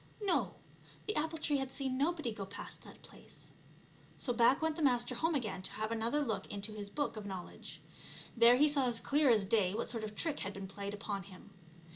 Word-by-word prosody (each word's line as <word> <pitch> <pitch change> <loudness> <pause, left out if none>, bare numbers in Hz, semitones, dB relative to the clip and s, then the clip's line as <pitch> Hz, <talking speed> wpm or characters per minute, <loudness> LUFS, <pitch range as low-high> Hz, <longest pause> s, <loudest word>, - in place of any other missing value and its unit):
No, 385 -4 +1 0.5
the 425 - -2
apple 320 +2 0
tree 295 -2 +1
had 270 -1 -3
seen 265 -2 -2
nobody 300 -2 0
go 215 -2 -5
past 195 +1 -7
that - - -14
place. - - -12 0.7
So 245 - -1
back 235 +3 +5
went 320 -1 0
the 330 - -4
Master 245 -3 +3
home 320 +6 +1
again 215 -8 -2
to - - -3
have 220 +1 -3
another 230 +6 +1
look 215 -7 -2
into 200 +1 -4
his 205 -1 -6
Book 290 0 -2
of 210 - -6
Knowledge. 185 -3 -8 0.5
There 235 +1 +7
he 295 +3 +6
saw 280 -3 +3
as 235 -2 +1
clear 290 -1 +3
as 215 -4 +4
day 200 -2 +2
what 230 - -2
sort 230 -2 -3
of 210 -1 -5
trick 315 +2 -1
had 195 - -4
been 195 -1 -6
played 200 +1 -5
upon 200 -1 -3
him. 185 -1 -13
235 Hz, 215 wpm, -34 LUFS, 205-290 Hz, 0.7 s, There